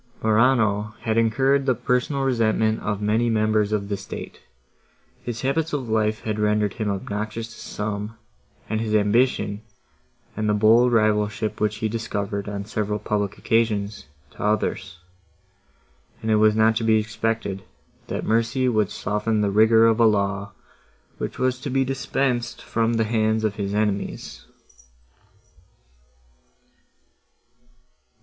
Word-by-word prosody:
Morano 110 -2 +2
had 110 -2 -1
incurred 135 +5 +2
the 130 - +3
personal 125 +4 0
resentment 110 -3 +1
of 105 0 -3
many 110 +3 +2
members 110 -1 +1
of 100 -2 -1
the 100 - -1
state; - - -8 0.8
his 120 -2 -5
habits 155 +4 -1
of 135 -4 -2
life 110 0 +1
had 105 -1 -3
rendered 105 -1 +1
him 110 -2 -3
obnoxious 110 +3 -4
to - - -14
some; 105 +1 -5 0.5
and 110 0 -1
his 110 -1 -1
ambition, 105 -1 +2 0.7
and 105 0 -1
the 105 - +3
bold 115 +4 +5
rivalship, 105 -1 +1
which 105 0 +1
he 110 +1 -2
discovered, 100 -2 -3
on 100 -1 -5
several 105 0 -2
public 105 -1 -2
occasions,—to 100 -11 -2
others; 105 -4 -1 1.3
and 110 - 0
it 110 - +4
was 105 0 +4
not 110 +1 +4
to 115 - -1
be 110 -1 +4
expected, 110 -2 -2 0.5
that - - -4
mercy 115 +3 +1
would 110 -5 +2
soften 105 +2 -1
the 100 -1 +1
rigour 110 +2 +5
of 115 0 +3
a 115 - +6
law, 100 -1 0 0.7
which - - -4
was 130 0 0
to 140 - -5
be 135 +1 +1
dispensed 130 -2 -1
from 115 0 -1
the 115 -1 +2
hands 110 0 +1
of 110 -2 +1
his 100 -1 -2
enemies. 105 -2 -3
110 Hz, 135 wpm, -23 LUFS, 105-115 Hz, 1.3 s, a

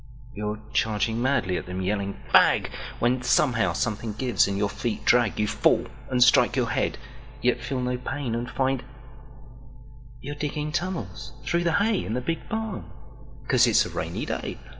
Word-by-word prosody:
You're 105 0 -3
charging 110 +1 +1
madly 120 -9 +1
at 90 - -6
them 90 +1 -4
yelling 100 0 -2
"Fag!"When 125 +2 +3
somehow 125 - +2
something 110 +2 -2
gives 120 -2 +2
and 100 -1 -2
your 100 0 +1
feet 110 +2 -4
drag. 120 -4 +3
You 105 - +2
fall - - +2 0.2
and 125 -1 +4
strike 125 - +5
your - - 0
head; - - 0 0.5
yet 125 0 +2
feel 125 +3 -3
no 125 0 -1
painAnd 125 -3 -3
find… 130 +1 0 1.4
you're 140 +3 -6
digging 150 +1 -3
tunnels 175 +2 -4
through 170 0 0
the 170 - +2
hayIn 205 - +1
the 125 - -1
Big 165 +6 -4
Barn, 220 -3 -3 0.6
'cause - - +5
it's - - +4
a - - -5
rainy - - -3
day. - - -4
125 Hz, 160 wpm, -26 LUFS, 105-145 Hz, 1.4 s, strike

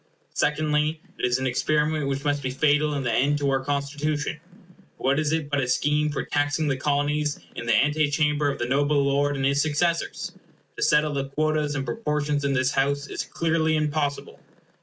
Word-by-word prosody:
Secondly, 150 +1 +1 0.2
it - - +1
is 125 0 +2
an 130 - -3
experiment 150 +3 +1
which 140 0 -2
must 145 0 +1
be 130 - -2
fatal 150 +2 +2
in 140 - -2
the 120 - 0
end 145 +5 +2
to 140 -1 0
our 135 -1 0
Constitution. 145 +2 -2 0.6
For - - -14
what 135 +3 +2
is 155 -1 0
it 160 -2 -1
but 145 0 0
a 125 - -1
scheme 150 +4 +1
for 145 - -2
taxing 145 +2 0
the 140 - +1
Colonies 145 +2 0 0.2
in 120 - -6
the - - +4
ante 150 +1 +2
chamber 150 -1 +1
of 140 - -3
the 120 - -2
noble 145 +3 +2
lord 145 +1 +1
and 135 -1 -1
his 140 +1 +2
successors? 165 +3 -1 0.4
To - - -7
settle 150 0 +3
the 135 -1 -2
quotas 150 0 0
and 135 -2 -2
proportions 145 +3 -1
in 140 0 +1
this 130 0 +1
House 140 +1 0
is - - -4
clearly 160 -1 0
impossible. 150 -2 -2
145 Hz, 200 wpm, -25 LUFS, 140-150 Hz, 0.6 s, the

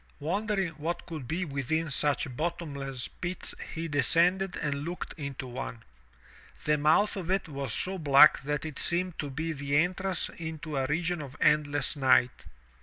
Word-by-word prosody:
Wonder 205 +7 -1
ing 190 -3 0
what 165 +3 -3
could 155 -7 -7
be 175 +7 -1
within 150 +2 -1
such 140 -2 +1
bottomless 140 -5 -3
pits 180 +1 -4 0.2
he 165 +1 -3
descended 175 +5 +3
and 140 -1 -2
looked 175 +3 -5
into 140 -3 -6
one. 125 -2 -6 0.8
The 150 -1 +2
mouth 160 +9 +3
of 185 -3 -5
it 190 -1 +1
was 140 -5 -4
so 190 +8 -1
black 150 -1 +7
that 150 +2 -2
it 155 -3 -5
seemed 175 0 0
to 145 - -3
be 160 +5 -3
the 140 -1 0
entrance 185 +3 0
into 160 -2 -5
a 135 -1 0
region 165 +3 -1
of 140 -2 -9
endless 145 -1 +2
night. 130 -3 +3
155 Hz, 165 wpm, -29 LUFS, 140-175 Hz, 0.8 s, black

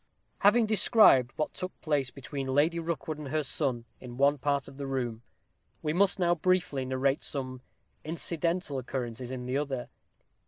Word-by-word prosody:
Having 220 +3 +5
described 210 - +5
what 155 - -2
took 185 0 -5
place 145 -4 0
between 135 +1 -6
Lady 150 +6 +2
Rookwood 160 -2 -4
and 150 - -6
her 155 +3 -1
son 130 -4 -2
in 120 -1 -10
one 140 +1 +3
part 140 0 0
of 135 0 -12
the 140 -1 -5
room, 120 -4 -3 0.6
we 150 - 0
must 195 +3 +3
now 175 -2 +3
briefly 175 -5 0
narrate 130 +2 0
some 130 -2 -3 0.4
incidental 165 -1 0
occurrences 125 -1 -5
in 125 -1 -5
the 130 +2 -1
other. 140 -4 -3
140 Hz, 160 wpm, -29 LUFS, 130-165 Hz, 0.6 s, Having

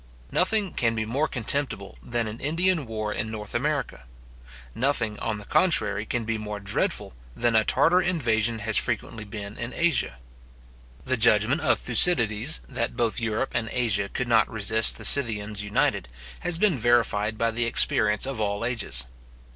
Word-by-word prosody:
Nothing 200 -1 0
can 115 -1 -1
be 110 -1 -3
more 135 +8 -2
contemptible 120 -5 -1
than 120 -1 -3
an 110 +2 -8
Indian 165 0 -1
war 110 -1 -4
in 110 - -4
North 105 -2 -8
America; 140 - -3 0.7
nothing, 115 - -1
on 110 -2 -4
the 105 - -11
contrary, 110 - +1
can 120 -2 -3
be 115 0 -3
more 105 -1 -6
dreadful 100 -9 -2 0.2
than 120 -1 0
a 110 - +4
Tartar 180 - +2
invasion 120 - -1
has 110 -2 +3
frequently 110 - -1
been 105 0 -9
in 120 +1 -5
Asia. 165 - 0 0.9
The - - 0
judgment - - +3
of - - +2
Thucydides, 120 -4 +3
that 120 -3 -4
both 120 -2 0
Europe 115 +2 -3
and 115 -2 -2
Asia 110 -5 -1
could 125 - -4
not 115 -2 +2
resist 110 +1 +3
the - - -7
Scythians 105 -6 +3
united, 100 -11 -1 0.3
has 175 -2 +3
been 175 -7 +1
verified 110 -2 0
by 115 0 0
the 120 +1 -1
experience 105 -2 +3
of 135 -4 -5
all 100 +1 -2
ages. 105 - +2
115 Hz, 165 wpm, -24 LUFS, 105-135 Hz, 0.9 s, a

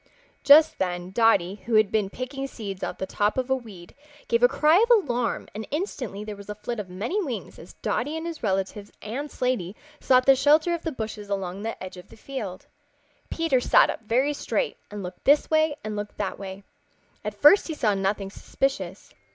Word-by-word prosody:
Just 300 +3 +7
then 180 -1 -2
Dotty, 200 -3 +2
who 235 - +1
had 215 -1 +4
been 210 -3 +1
picking 270 +4 -5
seeds 200 -7 -7
out - - -3
of - - -33
the - - -3
top 205 +4 0
of 260 0 -1
a - - +5
weed, 205 -9 -10 0.3
gave 235 0 +2
a 245 - +8
cry 310 +8 +4
of 470 - 0
alarm 250 - +2
and 215 +1 -6
instantly 265 - -4
there 210 -1 -6
was 200 0 -12
a 210 - -4
flit 215 +2 -5
of 195 -3 -6
many 225 - -2
wings 255 -8 -6
as - - -12
Dotty 310 +2 -1
and 320 - -5
his 335 -2 -6
relatives 200 0 -2
and 265 +8 -4
Slaty 240 -9 -2 0.2
sought 255 -1 +4
the 270 - +7
shelter 300 +5 +4
of 340 - -3
the 325 - -3
bushes 215 -5 -6
along 195 -1 -3
the 225 -2 -5
edge 185 0 -8
of 180 - -12
the - - -15
field. 215 -8 -6 0.6
Peter 330 -6 +1
sat - - +5
up - - -8
very 255 +7 +1
straight 485 - -2
and 205 -1 -7
looked 180 0 -8
this 290 +3 +4
way 315 -1 +3
and 215 0 -4
looked 205 0 -6
that 200 -3 -3
way. 195 0 -8 0.6
At 210 -1 -4
first 295 +8 +7
he 320 - -4
saw 220 -8 +1
nothing 195 0 -1
suspicious. 195 -7 -3
225 Hz, 210 wpm, -25 LUFS, 200-275 Hz, 0.6 s, a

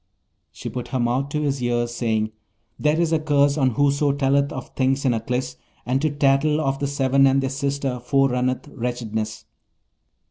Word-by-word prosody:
She - - -8
put 125 -1 -5
her 130 - -2
mouth 125 +4 0
to 150 +1 -2
his 140 -2 -1
ear, 120 -1 +1
saying, 110 -2 -1 0.5
'There 150 +2 +2
is 165 -1 +1
a 160 - +3
curse 145 -2 +2
on 130 -6 +1
whoso 145 0 +2
telleth 140 0 +1
of 130 - -7
things 135 +1 0
in 125 - +3
Aklis, 115 - -3 0.3
and 130 +2 0
to 155 - +2
tattle 145 +1 +2
of 135 -2 -1
the 140 - -1
Seven 135 -1 +3
and 135 0 +3
their 135 -1 -1
sister 140 -2 -2
forerunneth 130 0 +1
wretchedness.' 110 -3 -4
135 Hz, 175 wpm, -23 LUFS, 125-140 Hz, 0.5 s, a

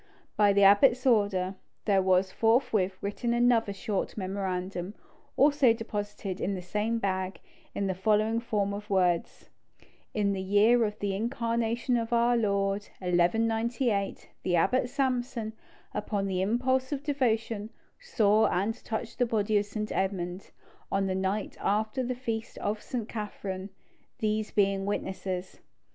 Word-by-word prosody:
By 205 -1 +5
the 200 0 +4
abbot's 240 +6 +6
order, 200 -6 +2 0.3
there 195 -3 +3
was 185 0 +2
forthwith 225 -5 +2
written 235 +4 -1
another 240 -3 +3
short 200 +1 -3
memorandum, 185 -1 -3 0.4
also 285 -4 +5
deposited 205 -4 -5
in 195 +1 -1
the 185 - -5
same 210 +5 -1
bag, 190 -3 -2 0.4
in 200 - -1
the 190 - 0
following 215 +4 +2
form 205 -4 -1
of 205 +1 -7
words: 180 -3 0 0.6
"In 200 -2 +1
the 190 - -3
year 210 +5 +4
of 210 0 -4
the 200 -2 -2
incarnation 235 +1 0
of 230 0 -3
our 235 +1 +3
Lord, 200 -2 0
1198, 225 +4 0
the 180 - +1
abbot 245 +9 +2
Samson, 250 -4 -1 0.4
upon 205 -1 -2
the 185 -1 -1
impulse 255 +6 +1
of 285 -1 -3
devotion, 225 -7 0 0.3
saw 220 - +3
and 200 +5 0
touched 225 +2 -5
the 245 - +3
body 215 -1 0
of 205 - -3
St. 215 +1 -4
Edmund 190 -1 -2 0.4
on 195 0 +1
the 190 - -1
night 190 +2 -2
after 215 +4 0
the 250 +1 -2
feast 230 -3 -4
of 210 +1 -2
St. 240 -4 -4
Catherine, 200 -3 -5 0.5
these 215 0 -1
being 195 -1 +1
witnesses." 190 -2 -4
210 Hz, 140 wpm, -29 LUFS, 195-230 Hz, 0.6 s, abbot's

